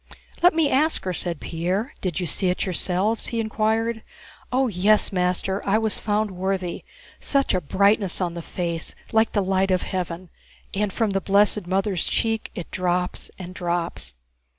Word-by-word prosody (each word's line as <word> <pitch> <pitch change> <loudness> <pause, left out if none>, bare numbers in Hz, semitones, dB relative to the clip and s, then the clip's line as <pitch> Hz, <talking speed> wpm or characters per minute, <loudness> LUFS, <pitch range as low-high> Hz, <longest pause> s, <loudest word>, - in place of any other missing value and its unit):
"Let 355 -1 +6
me 325 -2 +4
ask 300 +4 +2
her," 185 - -2
said 170 -2 -3
Pierre. 185 - -2
"Did 180 -2 -1
you 180 - -1
see 180 +4 0
it 180 - 0
yourselves?" 190 +4 0
he 230 - -2
inquired. 220 +1 0 0.5
"Oh, 260 +1 +3
yes, 210 +1 +3
master, 180 +1 0
I 200 +2 +3
was 220 -1 +1
found 210 0 0
worthy. 185 -1 -2 0.4
Such 275 -1 +2
a 185 - +1
brightness 200 +4 +2
on 175 -2 -1
the 170 - -5
face 170 -1 -3 0.2
like 220 0 +3
the 205 - +2
light 190 0 +1
of 185 -1 +2
heaven, 180 -2 -4 0.4
and 205 0 0
from 220 +1 0
the 195 0 0
blessed 200 0 +3
Mother's 190 -1 +1
cheek 225 -1 0
it 175 - -6
drops 180 0 -1
and 185 -1 -8
drops...." 170 - -2
190 Hz, 170 wpm, -24 LUFS, 180-215 Hz, 0.5 s, Let